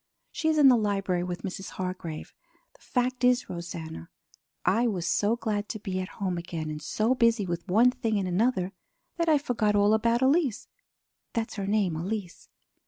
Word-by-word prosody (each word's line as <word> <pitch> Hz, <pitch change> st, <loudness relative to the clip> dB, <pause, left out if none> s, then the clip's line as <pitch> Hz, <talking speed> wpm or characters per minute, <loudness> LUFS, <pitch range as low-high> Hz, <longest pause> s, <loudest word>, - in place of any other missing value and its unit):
She 315 Hz, -, -2 dB
is 315 Hz, -, +2 dB
in 290 Hz, -2 st, +7 dB
the 255 Hz, -, +8 dB
library 195 Hz, -5 st, 0 dB
with 180 Hz, -1 st, -5 dB
Mrs. 190 Hz, 0 st, -5 dB
Hargrave. 180 Hz, -4 st, -5 dB, 0.4 s
The -, -, -25 dB
fact 250 Hz, 0 st, -1 dB
is, 250 Hz, 0 st, +3 dB
Rosanna, 165 Hz, -, -7 dB, 0.6 s
I 230 Hz, +5 st, +3 dB
was 185 Hz, -6 st, -2 dB
so 205 Hz, +5 st, +2 dB
glad 210 Hz, -3 st, -2 dB
to 215 Hz, -, -4 dB
be 190 Hz, -2 st, -3 dB
at 185 Hz, -, -3 dB
home 185 Hz, -3 st, -1 dB
again 165 Hz, -2 st, -5 dB
and 150 Hz, 0 st, -6 dB
so 220 Hz, +9 st, +1 dB
busy 230 Hz, -4 st, +3 dB
with 170 Hz, +1 st, -4 dB
one 225 Hz, +7 st, +5 dB
thing 235 Hz, -4 st, -1 dB
and 195 Hz, -2 st, -1 dB
another, 190 Hz, 0 st, +1 dB, 0.4 s
that 335 Hz, -1 st, +1 dB
I 310 Hz, -, +6 dB
forgot 225 Hz, -7 st, 0 dB
all 205 Hz, +1 st, +4 dB
about 230 Hz, +3 st, +2 dB
Elise. 270 Hz, -, +2 dB, 0.7 s
That's 225 Hz, 0 st, -2 dB
her 195 Hz, -1 st, -3 dB
name; 200 Hz, -5 st, +1 dB
Elise. 185 Hz, +2 st, -5 dB
205 Hz, 180 wpm, -28 LUFS, 180-240 Hz, 0.7 s, the